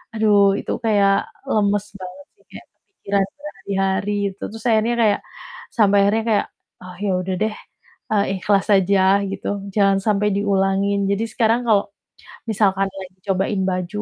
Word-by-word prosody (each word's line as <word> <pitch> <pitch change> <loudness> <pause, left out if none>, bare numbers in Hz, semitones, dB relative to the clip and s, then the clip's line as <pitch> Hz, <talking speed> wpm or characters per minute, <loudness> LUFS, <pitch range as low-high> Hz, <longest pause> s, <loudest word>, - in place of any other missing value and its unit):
aduh, 205 -2 +4
itu - - -5
kayak 200 -2 +2 0.2
lemes 205 -1 +1
banget 185 +1 -9
sih. - - -31
Kayak - - -11
kepikiran 200 - -3 0.2
berhari-hari 195 -7 -2 0.2
itu. - - -11
Terus 225 +1 -10
akhirnya 225 +2 +2
kayak 210 -2 +3 0.5
sampai 205 -3 +3
akhirnya 220 +2 +1
kayak, 210 -2 +2 0.4
"Oh, 180 -1 -10
ya 200 - +1
udah 185 0 -2
deh, 215 0 0 0.6
eee, 200 -1 +2
ikhlas 200 +1 +1
aja," 195 0 +3
gitu, 195 0 -5 0.3
jangan 195 -2 +3
sampai 210 -1 +1
diulangin. 200 0 +1
Jadi 200 +2 0
sekarang 230 +1 +1
kalau, 205 -2 +3 0.6
misalkan 195 -2 +2
lagi 190 -1 -10
cobain 195 +1 0
baju 185 +3 -3
200 Hz, 145 wpm, -20 LUFS, 195-210 Hz, 0.6 s, aduh